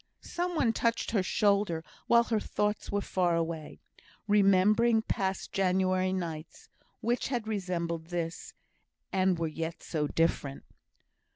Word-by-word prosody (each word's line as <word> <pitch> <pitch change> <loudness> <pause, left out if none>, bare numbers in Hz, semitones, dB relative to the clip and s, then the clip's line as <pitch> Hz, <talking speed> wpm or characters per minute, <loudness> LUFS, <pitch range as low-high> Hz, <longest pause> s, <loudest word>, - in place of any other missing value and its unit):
Some 355 0 -3
one 245 -7 +2
touched 230 +1 0
her 215 -4 +2
shoulder 200 -3 +1 0.2
while 235 0 +6
her 225 -2 0
thoughts 210 0 -2
were 205 0 0
far 180 -3 +1
away, 165 -2 -3 0.5
remembering 210 +3 +4
past 190 -3 -2
January 185 0 +1
nights, 170 -4 -5 0.3
which 240 +2 0
had 240 -5 -2
resembled 175 -5 -2
this, 170 -1 -4 0.6
and 185 -2 +2
were 165 - -1
yet 160 +1 -4
so 150 -3 -1
different. 145 -4 0
190 Hz, 125 wpm, -30 LUFS, 170-215 Hz, 0.6 s, while